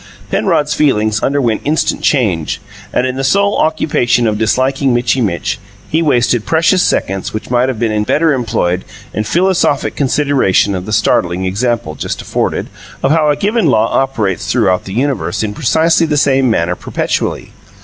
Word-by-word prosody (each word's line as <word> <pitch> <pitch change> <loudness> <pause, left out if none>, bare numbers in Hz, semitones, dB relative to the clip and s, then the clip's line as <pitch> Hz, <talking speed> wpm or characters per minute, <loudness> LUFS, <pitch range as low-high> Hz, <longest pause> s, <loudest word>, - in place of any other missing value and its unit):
Penrod's 150 0 +1
feelings 110 -8 +1
underwent 130 -6 0
instant 155 +2 0
change, 100 - 0 0.3
and 125 - +1
in 130 0 -3
the 135 - -2
sole 200 +8 +2
occupation 145 -6 +1
of 105 -2 0
disliking 130 +3 +1
Mitchy 125 +2 +1
Mitch, 100 -1 -2 0.3
he 160 +2 +2
wasted 120 -6 +2
precious 165 - +2
seconds 95 - -1
which 110 - -6
might 125 +1 +2
have 130 - -3
been 110 -2 0
better 155 +8 +2
employed 110 -8 -1 0.3
in 110 - -1
philosophic 175 - +1
consideration 135 -8 +1
of 90 0 -4
the - - -4
startling 95 -4 +1
example, 100 -3 -1
just 75 - -5
afforded, - - -2 0.4
of 135 - +2
how 155 -1 +3
a 145 - +2
given 210 +3 0
law 115 -4 +2
operates 115 -9 -1
throughout 90 -1 +1
the 95 - -7
universe 125 -6 -1
in 105 -1 -3
precisely 160 +8 +2
the 150 -1 0
same 135 -2 +3
manner 90 -5 0
perpetually. - - -3
125 Hz, 160 wpm, -14 LUFS, 105-145 Hz, 0.4 s, how